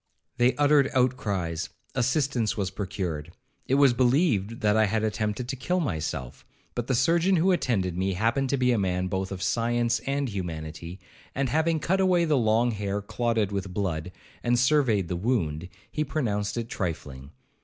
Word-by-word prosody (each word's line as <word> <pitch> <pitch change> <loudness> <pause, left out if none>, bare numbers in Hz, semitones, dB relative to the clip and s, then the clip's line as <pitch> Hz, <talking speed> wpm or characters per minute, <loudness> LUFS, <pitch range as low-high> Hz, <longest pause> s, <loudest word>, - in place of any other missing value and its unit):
They 120 +1 +3
uttered 145 -1 +4
outcries,—assistance 125 - -1
was 95 -3 -1
procured,—it 95 - -4
was 140 -3 +5
believed 120 - +1
that 105 -1 +3
I 110 -1 +4
had 110 +2 0
attempted 110 +2 -2
to 135 - -2
kill 180 +8 -1
myself; 80 - -3 0.3
but 120 -1 -3
the 130 - +1
surgeon 170 +9 +3
who 180 +3 +3
attended 100 - 0
me 95 +2 0
happened 115 +7 0
to 140 - +1
be 125 -1 +2
a 120 - +2
man 90 -1 0
both 95 +1 -2
of 90 -2 -4
science 120 0 +1
and 140 0 0
humanity, 85 -3 -6 0.4
and 135 -1 0
having 160 +3 +1
cut 190 +5 0
away 180 -2 +3
the 155 -2 +2
long 115 0 +3
hair 100 -1 -2
clotted 110 0 -1
with 95 -2 -4
blood, 90 -4 -2 0.3
and 120 0 +2
surveyed 125 - +3
the 90 - -2
wound, 90 -6 -1 0.2
he 150 - -1
pronounced 105 -8 -2
it 115 -1 -2
trifling. 75 - -5
115 Hz, 165 wpm, -26 LUFS, 95-130 Hz, 0.4 s, was